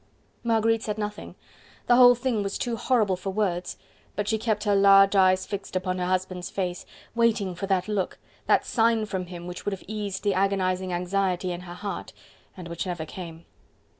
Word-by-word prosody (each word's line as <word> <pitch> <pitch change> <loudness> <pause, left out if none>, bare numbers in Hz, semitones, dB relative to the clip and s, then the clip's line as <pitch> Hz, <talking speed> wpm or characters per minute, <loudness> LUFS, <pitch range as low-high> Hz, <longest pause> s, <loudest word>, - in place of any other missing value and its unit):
Marguerite 225 -1 +2
said 210 -1 -3
nothing; 210 -1 -5 0.5
the 240 - +5
whole 245 0 +8
thing 245 -3 -1
was 200 0 -3
too 240 -2 -2
horrible 220 -5 +2
for 185 +2 -5
words, 190 -3 -1 0.4
but 205 0 -2
she 220 0 +1
kept 215 -2 -1
her 205 -2 +2
large 195 0 +6
eyes 185 -1 +4
fixed 200 -2 -6
upon 185 0 -1
her 180 - -1
husband's 185 -1 -2
face... 180 -2 -3 0.3
waiting 230 -5 +1
for 195 +3 -5
that 190 -1 +1
look, 205 -3 -2 0.3
that - - +3
sign 225 -1 +2
from 190 -3 -4
him 175 -1 -8
which 180 0 -7
would 205 - -1
have 190 - -7
eased 205 -2 -4
the 205 -2 +2
agonizing 185 -1 0
anxiety 180 0 -1
in 175 0 -5
her 175 -1 -9
heart, 200 +2 -6 0.4
and 180 -2 -8
which 170 +2 -4
never 175 -3 -3
came. 165 -1 -9
195 Hz, 190 wpm, -26 LUFS, 180-215 Hz, 0.5 s, whole